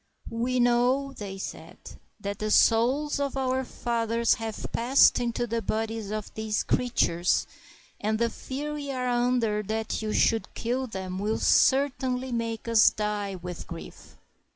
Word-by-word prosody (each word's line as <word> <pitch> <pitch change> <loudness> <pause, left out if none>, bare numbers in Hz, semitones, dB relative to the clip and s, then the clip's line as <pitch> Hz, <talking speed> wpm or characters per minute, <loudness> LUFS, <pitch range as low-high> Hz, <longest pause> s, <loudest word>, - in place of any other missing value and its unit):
"We 245 +2 0
know," 245 +3 +2
said 195 -2 -6
they, 190 - -7 0.5
"that 200 0 -4
the 215 - -2
souls 255 +8 +3
of 280 -1 -2
our 260 0 0
fathers 230 -2 0
have 220 -1 -5
passed 250 +4 +4
into 240 0 -1
the 230 0 -2
bodies 220 -1 -3
of 215 -1 -5
these 220 -1 -1
creatures, 180 -8 +1 0.5
and 215 +1 0
the 235 0 +1
fear 290 +6 -5
we 290 -1 -5
are 255 -1 -2
under 240 -3 +1
that 220 +2 -3
you 215 -1 -2
should 225 +1 +1
kill 250 +3 -2
them 190 -4 -5
will 210 +2 0
cer 275 +2 +4
tainly 255 -1 -3
make 230 -1 -3
us 230 -2 +6
die 210 -2 -3
with 180 -1 -7
grief." 170 -1 -10
230 Hz, 155 wpm, -27 LUFS, 215-255 Hz, 0.5 s, us